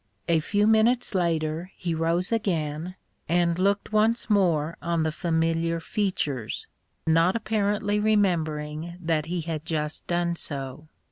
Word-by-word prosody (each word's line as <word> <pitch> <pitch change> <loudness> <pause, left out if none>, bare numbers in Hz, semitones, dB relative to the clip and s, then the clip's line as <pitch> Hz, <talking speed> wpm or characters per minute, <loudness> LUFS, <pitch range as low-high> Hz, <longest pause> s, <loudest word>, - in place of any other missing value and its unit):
A 165 -1 +4
few 205 +6 +1
minutes 220 +3 +3
later 165 -1 0
he 170 -2 -2
rose 165 +4 0
again, 170 -5 -1 0.3
and 170 0 +2
looked 200 +3 +1
once 220 +2 +2
more 170 -6 +2
on 170 -1 0
the 160 - 0
familiar 165 0 0
features, 160 - -2 0.4
not 165 +4 +3
apparently 210 -2 0
remembering 170 -6 0
that 160 -3 0
he 175 0 -2
had 155 -1 -4
just 150 -2 -3
done 175 0 0
so. 140 -1 -4
170 Hz, 130 wpm, -26 LUFS, 160-200 Hz, 0.4 s, A